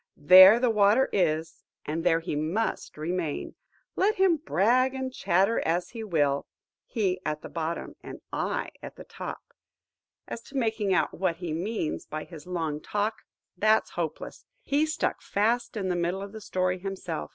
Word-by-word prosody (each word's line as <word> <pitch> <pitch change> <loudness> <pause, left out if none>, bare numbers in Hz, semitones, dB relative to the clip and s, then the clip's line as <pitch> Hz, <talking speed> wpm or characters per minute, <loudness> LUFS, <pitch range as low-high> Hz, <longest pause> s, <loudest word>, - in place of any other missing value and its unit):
There 185 +8 +9
the 245 -1 +2
water 210 +4 +4
is, 160 -3 0 0.2
and 160 +2 -3
there 165 -2 +3
he 160 - -3
must 165 +9 -2
remain, 165 0 -3 0.4
let 415 +3 +2
him 375 -3 +3
brag 255 - +2
and 260 -1 -4
chatter 195 +3 +2
as 175 +2 -1
he 230 -2 -6
will; 145 -8 0 0.4
he 190 -6 -1
at 155 0 -3
the - - -7
bottom, 165 0 -4
and - - -9
I - - -2
at - - -9
the - - -10
top. - - -8 0.7
As 230 - -6
to 275 - -7
making 220 -5 0
out 185 - +2
what 180 -1 -1
he 170 -2 -5
means 175 0 -3
by 155 0 -5
his 165 -2 -12
long 160 -4 -3
talk, 210 +4 -1 0.4
that's 215 +4 +2
hopeless. - - -5 0.2
He 295 +3 +1
stuck 315 +1 -1
fast 225 +3 0
in 195 -3 -2
the 180 - 0
middle 175 +3 -1
of 200 - -8
the 220 0 -9
story 185 -1 -1
himself. 185 -4 -5
185 Hz, 170 wpm, -27 LUFS, 165-225 Hz, 0.7 s, There